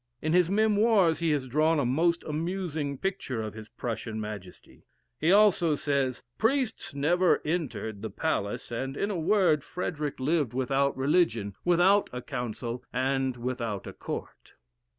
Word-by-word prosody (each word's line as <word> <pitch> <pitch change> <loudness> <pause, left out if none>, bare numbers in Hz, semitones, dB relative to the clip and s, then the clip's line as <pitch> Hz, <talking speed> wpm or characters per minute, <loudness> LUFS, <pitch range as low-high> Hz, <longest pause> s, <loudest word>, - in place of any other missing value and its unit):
In 155 +1 -1
his 180 -1 +4
"Memoirs," 205 -5 +3
he 165 -1 +1
has 145 -3 +1
drawn 155 +5 +2
a 145 - +1
most 165 +7 +1
amusing 160 -3 -3
picture 160 - -3
of 110 - -5
his 110 0 -9
Prussian 110 -1 -4
Majesty. 105 -4 -9 0.3
He, 160 +3 +3
also 190 -6 +5
says, 140 -3 -1 0.2
"Priests 230 - 0
never 175 +6 +3
entered 120 - -3
the 110 - -4
palace; 120 -9 -2
and, 135 +3 -3
in 200 - -1
a - - -2
word, 175 -4 +3
Frederick 150 -5 -4
lived 140 -3 0
without 135 +2 +1
religion, 130 - +1
without 180 +4 +4
a 125 0 -6
council, 120 +1 -4
and 130 0 0
without 120 -5 -3
a - - -7
court." - - -7
145 Hz, 150 wpm, -28 LUFS, 125-175 Hz, 0.3 s, also